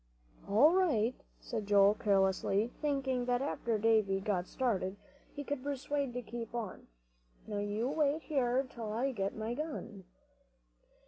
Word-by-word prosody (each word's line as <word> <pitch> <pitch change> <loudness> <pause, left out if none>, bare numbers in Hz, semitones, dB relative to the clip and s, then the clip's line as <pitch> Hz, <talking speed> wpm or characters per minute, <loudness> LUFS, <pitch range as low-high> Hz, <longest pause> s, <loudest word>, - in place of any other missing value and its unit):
"All 240 +11 +6
right," 260 - +2 0.3
said 220 -4 -4
Joel, 200 0 +6
carelessly, 200 +1 +2
thinking 270 -4 0
that 245 0 +1
after 235 -4 -1
Davie 215 -3 +3
got 190 -3 -1
started 200 -7 -1 0.4
he 290 - -4
could 285 -1 -3
persuade 280 +1 -2
him 245 - -8
to 250 0 -4
keep 235 +1 -6
on. 225 -5 -5 0.6
"Now, 210 -2 -3
you 205 +3 -1
wait 300 +1 +1
here 265 -2 +1
till 230 -4 -6
I 250 +5 0
get 195 -5 -2
my 220 +2 -3
gun." 240 - -5
235 Hz, 145 wpm, -33 LUFS, 205-270 Hz, 0.6 s, All